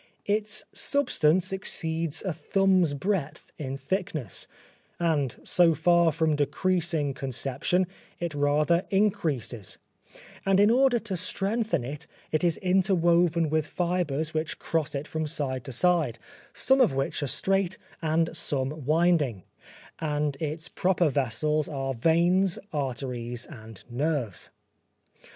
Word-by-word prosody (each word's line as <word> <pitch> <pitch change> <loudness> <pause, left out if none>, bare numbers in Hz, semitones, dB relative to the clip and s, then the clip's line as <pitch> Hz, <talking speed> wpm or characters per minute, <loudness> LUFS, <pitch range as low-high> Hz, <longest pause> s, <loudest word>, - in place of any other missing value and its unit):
Its 210 0 0
substance 185 - +1
exceeds 165 -4 -2
a 185 -4 -1
thumb's 180 0 +2
breadth 170 -1 -3
in 135 -2 -4
thickness, 155 - -3 0.5
and 150 -7 0
so 170 -2 +4
far 170 +1 +4
from 160 -1 +1
decreasing 155 0 0
conception, 135 +7 0 0.3
it 170 -2 -3
rather 150 +4 +2
increases; 150 - -1 0.7
and 195 0 +3
in 205 +2 +6
order 255 0 +4
to 215 -4 -4
strengthen 195 - 0
it 140 +4 -6 0.2
it 155 +1 0
is 170 -3 +2
interwoven 175 -3 +3
with 155 0 0
fibres 170 -4 -1
which 155 0 -2
cross 155 -2 -2
it 140 +2 -4
from 160 -1 -3
side 130 -3 -2
to 135 - -6
side, 155 -3 +2 0.3
some 265 0 +3
of 225 - +3
which 135 +2 -1
are 145 - -1
straight 190 +6 +1 0.2
and 165 +1 0
some 140 0 -1
winding, 155 - +2 0.6
and 150 -2 -1
its 160 +3 -4
proper 180 -2 +1
vessels 145 +3 0
are 135 -3 -2
veins, 170 +8 +3 0.2
arteries 125 -4 -3
and 110 -6 -11
nerves. 125 - -2
160 Hz, 125 wpm, -27 LUFS, 140-180 Hz, 0.7 s, in